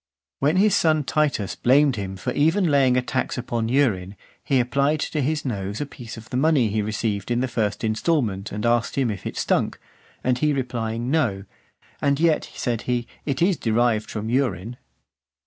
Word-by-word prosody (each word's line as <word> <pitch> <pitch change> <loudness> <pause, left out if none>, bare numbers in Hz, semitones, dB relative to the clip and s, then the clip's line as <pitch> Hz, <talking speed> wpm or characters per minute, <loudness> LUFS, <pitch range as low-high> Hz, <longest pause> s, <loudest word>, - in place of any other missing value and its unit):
When 145 +5 +2
his 205 +1 +4
son 155 -2 +3
Titus 140 -9 0
blamed 135 +2 +4
him 95 -2 -5
for - - -3
even 165 +3 +2
laying 130 -3 +4
a 125 - +1
tax 130 +1 -2
upon 115 -2 -2
urine, 105 -8 +1 0.3
he 135 -2 +2
applied 140 +5 +1
to 155 - -1
his 155 +3 -1
nose 100 -4 -3
a 145 - -1
piece 120 -5 -10
of 110 0 -12
the 125 - -1
money 140 -5 +3
he 105 +1 0
received 105 -1 -2
in 120 0 +1
the 130 - 0
first 110 -4 -2
instalment, 110 - 0
and 105 +2 -3
asked 120 0 +1
him, 130 -5 +2
"if 100 - -6
it - - -6
stunk?" - - 0 0.4
And 125 -1 +1
he 150 +1 +2
replying 120 -2 -2
no, 115 -12 +1 0.6
"And 140 0 +2
yet," 160 -1 +2
said 120 -3 -2
he, 120 -1 0 0.2
"it 140 +2 0
is 185 -2 +3
derived 115 -1 +1
from 110 0 -4
urine." 120 -3 -1
125 Hz, 185 wpm, -23 LUFS, 110-145 Hz, 0.6 s, his